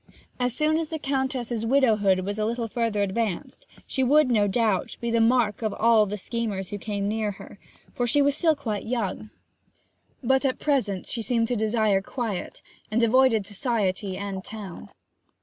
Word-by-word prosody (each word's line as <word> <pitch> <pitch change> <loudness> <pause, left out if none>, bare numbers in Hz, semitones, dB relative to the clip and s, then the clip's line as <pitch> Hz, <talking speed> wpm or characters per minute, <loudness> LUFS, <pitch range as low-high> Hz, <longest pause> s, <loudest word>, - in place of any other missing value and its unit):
As 245 -1 0
soon 310 +1 +2
as 325 - -2
the 320 - -3
Countess's 265 -5 -2
widowhood 220 -7 +3
was 205 +3 -4
a 215 - +1
little 230 +1 -2
further 225 -2 0
advanced 200 -1 -3 0.2
she 265 - -2
would, 285 +1 +4
no 210 -3 +3
doubt, 210 -2 0
be 235 -1 -2
the 230 0 +3
mark 225 -3 +2
of 215 -2 -1
all 225 -2 +4
the 205 +2 -4
schemers 205 -3 -3
who 205 - -4
came 200 -1 -3
near 215 -1 -1
her, - - -13 0.3
for 245 - -1
she 290 - +3
was 285 0 +3
still 320 0 +3
quite 220 -8 -4
young. 220 -3 -2 0.9
But 265 +2 +2
at 265 -2 0
present 240 -11 0
she 235 - -3
seemed 230 0 0
to 245 - 0
desire 215 -2 +2
quiet, 215 -2 -5 0.3
and 225 +2 +1
avoided 230 -2 +4
society 200 -3 -1
and 195 -2 -5
town. 195 - -9
225 Hz, 175 wpm, -25 LUFS, 205-250 Hz, 0.9 s, would